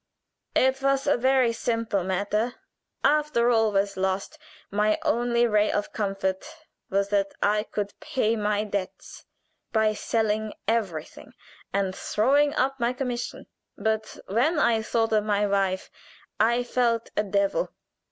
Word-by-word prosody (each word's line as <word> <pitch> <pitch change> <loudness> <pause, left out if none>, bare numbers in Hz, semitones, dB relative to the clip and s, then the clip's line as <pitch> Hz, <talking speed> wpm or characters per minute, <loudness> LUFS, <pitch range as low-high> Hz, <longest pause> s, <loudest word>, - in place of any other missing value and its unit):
"It 265 +1 +3
was 275 0 +1
a 290 - +3
very 255 -1 +3
simple 230 -4 -1
matter. 205 +6 -1 0.5
After 295 -6 +3
all 225 -2 +3
was 200 0 0
lost, 190 +1 -2 0.3
my 210 +1 +2
only 240 +1 +2
ray 210 -2 +2
of 205 - -2
comfort 195 -2 -1 0.5
was 200 +1 0
that 200 -1 0
I 210 +1 +3
could 205 -1 -3
pay 230 -3 0
my 210 -1 0
debts 200 -3 -5 0.5
by 220 -1 +2
selling 215 0 -1
everything, 195 -9 -2 0.4
and 195 -1 -1
throwing 285 +10 +2
up 270 +1 0
my 240 +1 +1
commission. 250 -2 -4 0.3
But 220 +1 -2
when 255 - +1
I 230 -6 +3
thought 225 0 0
of 215 -1 +3
my 210 -1 +1
wife 195 -2 0 0.5
I 235 +3 +3
felt 235 -2 0
a - - +3
devil. 200 - 0
220 Hz, 135 wpm, -26 LUFS, 200-240 Hz, 0.5 s, It